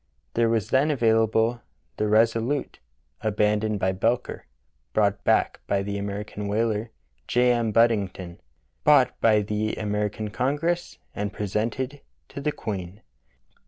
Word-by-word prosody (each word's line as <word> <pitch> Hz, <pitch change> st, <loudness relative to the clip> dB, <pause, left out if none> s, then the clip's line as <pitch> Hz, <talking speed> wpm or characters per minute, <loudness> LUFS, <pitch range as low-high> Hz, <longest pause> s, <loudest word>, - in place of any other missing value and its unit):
There 115 Hz, -1 st, +2 dB
was 115 Hz, 0 st, 0 dB
then 135 Hz, +4 st, +3 dB
available 115 Hz, -2 st, +2 dB, 0.4 s
the 105 Hz, -, 0 dB
Resolute^ 115 Hz, +5 st, +1 dB, 0.4 s
abandoned 105 Hz, 0 st, +1 dB
by 95 Hz, 0 st, +1 dB
Belcher, 115 Hz, +6 st, -1 dB, 0.5 s
brought 100 Hz, -1 st, +1 dB
back -, -, +2 dB
by 100 Hz, -1 st, +1 dB
the 100 Hz, 0 st, -3 dB
American 100 Hz, +1 st, -5 dB
whaler, 110 Hz, +1 st, 0 dB, 0.4 s
J. 125 Hz, 0 st, +3 dB
M. 115 Hz, -2 st, +1 dB
Buddington, 100 Hz, -6 st, +1 dB, 0.4 s
bought 140 Hz, -4 st, +5 dB
by 110 Hz, -2 st, +4 dB
the 105 Hz, +1 st, -2 dB
American 105 Hz, 0 st, -2 dB
Congress, 150 Hz, +9 st, -1 dB, 0.2 s
and 105 Hz, 0 st, -3 dB
presented 115 Hz, +8 st, -3 dB, 0.3 s
to 140 Hz, -, -7 dB
the 150 Hz, +1 st, 0 dB
Queen. 100 Hz, -5 st, -6 dB
110 Hz, 125 wpm, -25 LUFS, 105-120 Hz, 0.5 s, bought